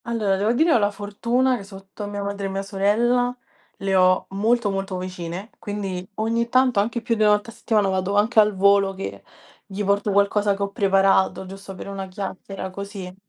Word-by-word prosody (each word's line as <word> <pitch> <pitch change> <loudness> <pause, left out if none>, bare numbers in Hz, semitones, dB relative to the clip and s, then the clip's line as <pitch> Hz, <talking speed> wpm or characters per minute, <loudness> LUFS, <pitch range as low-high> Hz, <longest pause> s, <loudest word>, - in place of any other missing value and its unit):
Allora 220 -5 0
devo 205 +3 +1
dire 315 +6 +3
ho - - +5
la 205 -1 +2
fortuna 235 +6 0
che 200 - -8
sotto, 195 +1 -9
mia 205 0 -4
madre 200 0 -3
e - - -4
mia 195 +1 -3
sorella 235 +5 +1 0.4
le 195 -1 -1
ho 185 0 +4
molto, 215 +2 +1
molto 195 -1 -3
vicine, 180 +2 -6
quindi 195 -3 -4
ogni 230 +2 0
tanto 255 -3 +3
anche 230 +3 -1
più 235 - 0
di 220 - -3
1 210 -1 +5
volta 210 +2 -1
a - - -15
settimana 210 -3 +1
vado 190 +1 -1
anche 215 +3 +3
al 210 -1 +4
volo 200 0 +4
che 195 - -6 0.4
gli 205 +1 -5
porto 200 +1 +1
qualcosa 200 0 +2
che 200 - -3
ho 200 - -3
preparato 195 -1 +2
giusto 195 +1 -9
per 185 - -8
una 195 -1 -5
chiacchiera 190 0 -6
così. 195 -1 -7
200 Hz, 200 wpm, -23 LUFS, 195-215 Hz, 0.4 s, ho